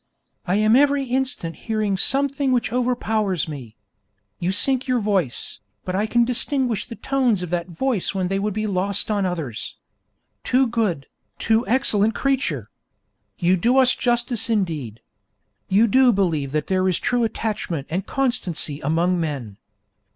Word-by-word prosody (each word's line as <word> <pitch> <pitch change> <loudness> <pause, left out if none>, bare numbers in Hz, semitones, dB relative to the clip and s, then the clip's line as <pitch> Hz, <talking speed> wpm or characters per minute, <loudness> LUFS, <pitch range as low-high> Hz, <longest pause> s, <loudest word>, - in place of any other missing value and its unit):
I 180 - +1
am 215 +2 +4
every 285 +1 +3
instant 260 -9 -2
hearing 215 -3 -2
something 275 +5 +2
which 235 -3 0
overpowers 220 - 0
me. 130 -8 -8 0.6
You 175 +2 0
sink 260 +7 +2
your 250 -1 +1
voice, 195 - -1 0.3
but 180 - -3
I 205 +3 0
can 240 +1 +3
distinguish 250 -2 0
the 235 - -8
tones 250 -9 0
of 175 - -6
that 175 -1 -1
voice 200 +3 -1
when 185 -2 0
they 195 +1 -1
would 205 0 -2
be 215 0 -1
lost 200 +1 0
on 200 -3 +1
others. 155 -11 -5 0.7
Too 260 +1 +3
good, 215 - -1 0.3
too 225 +2 +1
excellent 225 -4 +2
creature! 185 - -1 0.7
You 175 +2 +2
do 235 +8 +2
us 255 -1 +5
justice 240 -2 0
indeed. 155 - -2 0.7
You 205 +4 +4
do 255 +3 +4
believe 165 - 0
that 150 0 -1
there 185 0 +1
is 180 - 0
true 245 -1 0
attachment 210 -9 -3
and 185 +4 -2
constancy 195 - 0
among 170 +5 +1
men. 135 -11 -4
210 Hz, 150 wpm, -22 LUFS, 175-245 Hz, 0.7 s, us